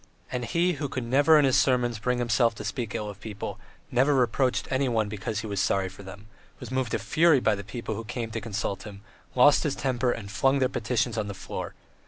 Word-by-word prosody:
And 125 -1 -2
he, 175 +8 +1
who 145 -2 -4
could 130 - -3
never 145 +6 +5
in 150 - +5
his 130 - +3
sermons 120 -3 +2
bring 125 +3 0
himself 120 -1 +2
to - - -7
speak 115 -5 -4
ill 105 - -3
of 100 -1 -8
people, 105 -2 -6 0.3
never 135 +4 +3
reproached 125 +1 +1
anyone 125 -5 +1
because 105 +1 -4
he - - -7
was 100 -2 -3
so - - +2
sorry 95 -1 -1
for 95 - -13
them, 95 +1 -11 0.3
was - - -8
moved 130 -4 -1
to - - +2
fury 165 -1 +4
with 110 -3 +2
the - - -6
people 110 +3 -5
who 115 +2 -5
came 115 0 -5
to 115 0 -4
consult 100 -2 -3
him, 100 -1 -10 0.3
lost 140 +3 +6
his 150 -3 -1
temper 125 -2 0
and 100 -4 -6
flung 135 +7 +2
their 130 -2 +2
petitions 115 -1 -1
on 105 - -2
the 100 - -6
floor. 95 - -6
120 Hz, 235 wpm, -27 LUFS, 105-130 Hz, 0.3 s, lost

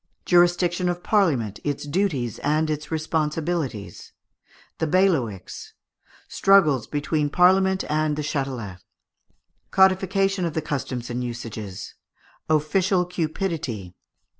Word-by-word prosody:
Jurisdiction 175 0 +3
of 175 0 -3
Parliament, 140 - +1
its 145 0 -3
Duties 145 - -1
and 155 +2 +1
its 150 0 -4
Responsibilities. 155 - -3 0.7
The 160 - 0
Bailiwicks. 150 - 0 0.5
Struggles 155 - +3
between 145 0 -1
Parliament 190 +3 +3
and 155 0 0
the 150 - -3
Châtelet. 130 -10 -4 0.9
Codification 190 0 +2
of 165 -3 -2
the 160 - 0
Customs 130 -4 -4
and 125 +1 -2
Usages. 115 -5 -6 0.6
Official 180 +4 +2
Cupidity. 160 - -3
155 Hz, 100 wpm, -24 LUFS, 130-180 Hz, 0.9 s, Jurisdiction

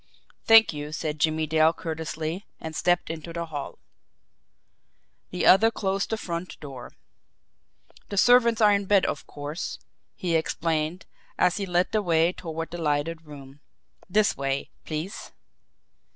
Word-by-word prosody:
"Thank 225 -4 +7
you," 150 0 -6
said 155 -1 -4
Jimmie 155 +1 +1
Dale 160 +1 +3
courteously 160 +3 -5
and 160 -1 -7
stepped 175 -1 +1
into 165 +1 -7
the 170 0 -4
hall. 150 -3 -6 1.5
The 180 - -2
other 215 +4 +7
closed 195 -3 -2
the 220 - -1
front 170 -3 -5
door. 135 -4 -9 1.2
"The 200 - -5
servants 235 0 +5
are 210 -1 +6
in 200 0 0
bed, 195 -1 +4
of 145 - -3
course," 145 +4 -5 0.4
he 175 -2 -2
explained, 160 +1 -1 0.3
as 180 0 +3
he 200 -2 -3
led 180 0 +1
the 215 - +1
way 170 -2 +2
toward 165 -2 -6
the 175 0 -6
lighted 160 +2 -1
room. 140 -1 -12 0.5
"This 210 +3 +3
way, 135 0 -2
please." 160 +6 -5
165 Hz, 140 wpm, -26 LUFS, 155-190 Hz, 1.5 s, Thank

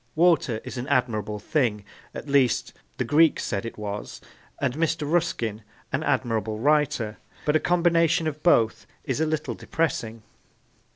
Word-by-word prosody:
Water 160 -9 +3
is 130 0 -6
an 125 - -5
admirable 110 -6 0
thing 105 -3 0 0.3
at - - -7
least, 140 -4 +2 0.2
the - - 0
Greeks 155 +6 +3
said 100 +2 -2
it - - -9
was 105 -1 -5 0.4
and 135 -3 0
Mr. 165 +1 0
Ruskin 155 -10 0
is 110 - -20 0.3
an - - +1
admirable 110 -3 0
writer; 135 -5 +1 0.3
but 150 - +2
a - - +5
combination 170 -2 +2
of 155 -1 -3
both 115 -10 +3 0.2
is 135 +3 -2
a 160 - +2
little 155 0 -2
depressing. 120 - -2
135 Hz, 155 wpm, -25 LUFS, 110-160 Hz, 0.4 s, a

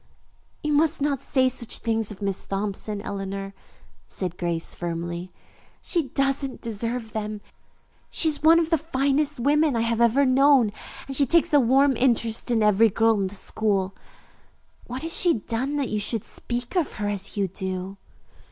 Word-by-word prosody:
"You 300 0 0
must 310 +2 +3
not 280 -2 0
say 260 -2 +2
such 240 -2 -1
things 225 -2 -1
of 205 0 -9
Miss 195 -1 -2
Thompson, 200 +1 -3
Eleanor," 195 0 -5 0.5
said 180 -3 -3
Grace 170 -2 -3
firmly. 170 +1 -5 0.5
"She 335 -6 -1
doesn't 275 0 -1
deserve 230 0 -4
them. 215 -1 -4 0.7
She 325 - +4
is 305 -2 -1
one 325 +2 +6
of 330 0 -1
the 325 - +3
finest 285 -1 0
women 295 +2 +2
I 230 - +1
have 230 0 0
ever 240 +4 +4
known, 265 -3 +4 0.3
and 270 - -5
she 280 0 +3
takes 335 +3 +2
a 290 - +7
warm 270 +2 +4
interest 235 -2 +1
in 230 -3 +2
every 210 +2 +5
girl 225 0 +2
in 190 - -1
school. 195 -1 -1 0.9
What 255 +3 -6
has 325 - -1
she 350 -2 +3
done 240 +7 -2
that 280 -3 -1
you 215 - -1
should 215 +1 -1
speak 240 +6 -5
of 345 -6 0
her 205 -1 -3
as 205 0 -3
you 200 -1 +1
do?" 190 +1 -5
230 Hz, 170 wpm, -24 LUFS, 200-275 Hz, 0.9 s, a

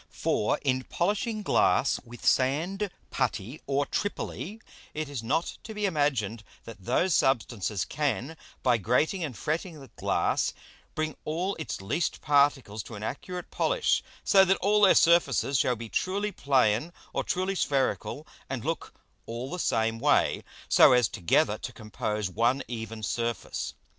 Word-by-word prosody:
For 105 - 0
in 130 -2 0
polishing 210 +4 -1
Glass 140 - +3
with 120 0 -11
Sand, 170 +10 +2 0.2
Putty, 115 +9 -2
or 140 +1 +1
Tripoly, 205 +3 -4 0.4
it 155 0 -2
is 140 -4 -5
not 140 +9 -1
to 220 - -9
be 210 0 -1
imagined 135 - 0 0.2
that 105 -5 -11
those 185 - +2
Substances 110 -7 +1
can, 145 0 -2 0.3
by 120 -3 +3
grating 135 - +1
and 140 -7 -4
fretting 160 +1 -3
the 135 -3 -12
Glass, - - +1 0.4
bring 155 -1 -2
all 175 +6 -1
its 155 - -4
least 145 - -1
Particles 140 -7 +2
to 115 - -10
an 105 - -7
accurate 180 +10 -5
Polish; - - +1 0.2
so 195 -1 +6
that 190 0 +3
all 210 +2 +2
their 195 - +7
Surfaces 140 -5 +4
shall 125 - +2
be 115 0 -7
truly 200 - -1
plain 130 - +2 0.2
or - - 0
truly 185 +2 -1
spherical, 140 -2 -1 0.2
and 130 -3 -4
look 165 +1 -3 0.3
all 120 +4 -5
the 180 - -4
same 115 -5 +1
way, 145 +4 +2 0.2
so - - +7
as 125 -3 +4
together 90 -3 +1
to - - -6
compose 105 -1 -3
one 120 +8 +1
even 115 -2 -6
Surface. 115 +3 -3
140 Hz, 150 wpm, -28 LUFS, 115-175 Hz, 0.4 s, their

